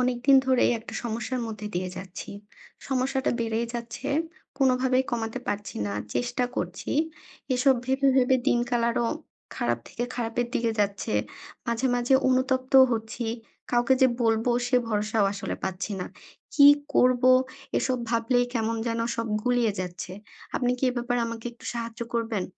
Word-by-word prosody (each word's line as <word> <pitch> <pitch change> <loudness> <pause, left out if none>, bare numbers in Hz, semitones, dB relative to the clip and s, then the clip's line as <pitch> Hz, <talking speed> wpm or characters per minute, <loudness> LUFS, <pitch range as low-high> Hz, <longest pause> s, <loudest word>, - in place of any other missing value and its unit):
অনেকদিন 250 +2 +4
ধরেই 260 -1 +4
একটা 225 - -10
সমস্যার 235 +2 -3
মধ্যে 215 -2 -6
দিয়ে 185 +1 -1
যাচ্ছি। 185 -1 -8 0.6
সমস্যাটা 265 0 0
বেড়েই 230 0 -1
যাচ্ছে 235 +3 -5 0.5
কোনোভাবেই 260 -1 +3
কমাতে 230 0 -2
পারছি 205 0 -3
না। 100 - -3 0.2
চেষ্টা 245 0 0
করছি। 180 +1 -4 0.6
এসব 265 +2 +4
ভেবে, 265 +1 +2
ভেবে 260 0 +4
দিনকাল 240 0 +1
আরও 235 0 0 0.5
খারাপ - - 0
থেকে 240 - -3
খারাপের 240 0 -1
দিকে 230 -2 +1
যাচ্ছে। 200 -1 -1 0.5
মাঝে, 235 +2 0
মাঝে 245 +2 +2
অনুতপ্ত 260 0 +1 0.2
হচ্ছি 225 +1 -3 0.5
কাউকে 240 +2 +4
যে 260 - +7
বলব 225 0 +2 0.2
সে 250 0 +3
ভরসাও 210 -1 +1
আসলে 200 - -4
পাচ্ছি 190 +2 -3
না। - - -3 0.5
কি 285 -3 +8 0.3
করব 250 0 +4 0.6
এসব 255 -1 0
ভাবলেই 245 +1 +2
কেমন 230 -1 0
যেন 230 0 -1 0.2
সব 230 0 -2 0.2
গুলিয়ে 245 -3 +2
যাচ্ছে। 180 0 -6 0.4
আপনি 245 -1 +1
কি 265 - 0
এ - - -4
ব্যাপারে 245 0 0
আমাকে 230 0 -6
একটু 235 - -18
সাহায্য 230 -1 -5
করবেন? 225 -4 -1
240 Hz, 145 wpm, -26 LUFS, 225-255 Hz, 0.6 s, কি